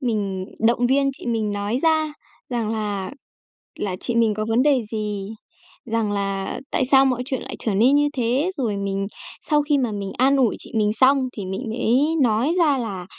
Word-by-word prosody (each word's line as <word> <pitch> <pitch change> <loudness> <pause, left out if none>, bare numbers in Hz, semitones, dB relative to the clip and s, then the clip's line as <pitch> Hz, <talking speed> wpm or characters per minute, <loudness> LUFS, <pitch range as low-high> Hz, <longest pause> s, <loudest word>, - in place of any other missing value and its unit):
Mình 205 -7 -2 0.2
động 240 +1 +3
viên 275 +1 +2
chị - - -10
mình 220 -3 -1
nói 205 +4 -1
ra 315 -2 +2 0.4
rằng 230 -3 -1
là 205 -3 -3 0.7
là 190 -3 -2
chị 240 - -3
mình 230 -2 +3
có 215 - -2
vấn 230 +3 +3
đề 275 -4 +3
gì, 210 -2 -3 0.6
rằng 225 -2 -1
là 195 -1 -2
tại 260 - +1
sao 270 +1 +5
mọi 250 -2 0
chuyện 260 -1 -3
lại - - -7
trở 215 - -1
nên 245 +8 +4
như 290 0 +4
thế? 260 +6 0
Rồi 225 -7 -1
mình 195 0 -2 0.3
sau 300 -2 +2
khi 290 0 +1
mà 250 -5 0
mình 200 -2 -4
an 270 +2 +4
ủi 250 -5 +2
chị - - -13
mình 210 -1 +2
xong 260 +5 +5 0.2
thì 200 - -4
mình 190 +5 -4
mới 245 +4 +2 0.2
nói 240 +6 +2
ra 305 -6 +3
là 200 -7 -4
230 Hz, 200 wpm, -22 LUFS, 205-265 Hz, 0.7 s, sao